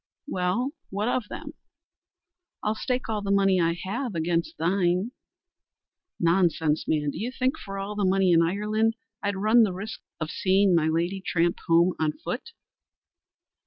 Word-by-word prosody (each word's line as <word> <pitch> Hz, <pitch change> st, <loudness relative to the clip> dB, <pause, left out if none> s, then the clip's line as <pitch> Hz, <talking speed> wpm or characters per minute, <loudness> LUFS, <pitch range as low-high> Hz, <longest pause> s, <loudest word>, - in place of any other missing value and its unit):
"Well, 235 Hz, +2 st, -1 dB, 0.2 s
what 205 Hz, +3 st, -2 dB
of 245 Hz, -3 st, 0 dB
them?" -, -, -7 dB, 1.1 s
"I'll 210 Hz, -, +1 dB
stake 250 Hz, +3 st, -2 dB
all 215 Hz, -2 st, -1 dB
the 200 Hz, -, -4 dB
money 195 Hz, -2 st, +3 dB
I 165 Hz, 0 st, +2 dB
have 225 Hz, +3 st, -3 dB
against 165 Hz, +1 st, -1 dB
thine." 180 Hz, +5 st, +1 dB, 1.1 s
"Nonsense, 165 Hz, -3 st, +2 dB
man! 150 Hz, -2 st, +1 dB
Do -, -, -7 dB
you 235 Hz, +4 st, -2 dB
think 260 Hz, 0 st, 0 dB
for 195 Hz, -1 st, -7 dB
all 195 Hz, +1 st, -4 dB
the 205 Hz, -1 st, -2 dB
money 190 Hz, -1 st, +3 dB
in 165 Hz, -1 st, +6 dB
Ireland 210 Hz, +6 st, +1 dB, 0.3 s
I'd 200 Hz, 0 st, -1 dB
run 215 Hz, +4 st, +5 dB
the 205 Hz, -5 st, +3 dB
risk 200 Hz, +4 st, -6 dB, 0.2 s
of 155 Hz, -1 st, -3 dB
seeing 195 Hz, 0 st, +3 dB
my 165 Hz, -2 st, +3 dB
lady 170 Hz, +4 st, 0 dB
tramp 170 Hz, -2 st, +1 dB
home 170 Hz, +2 st, +4 dB
on 155 Hz, -1 st, +1 dB
foot?" 245 Hz, -, -6 dB
195 Hz, 160 wpm, -26 LUFS, 170-215 Hz, 1.1 s, in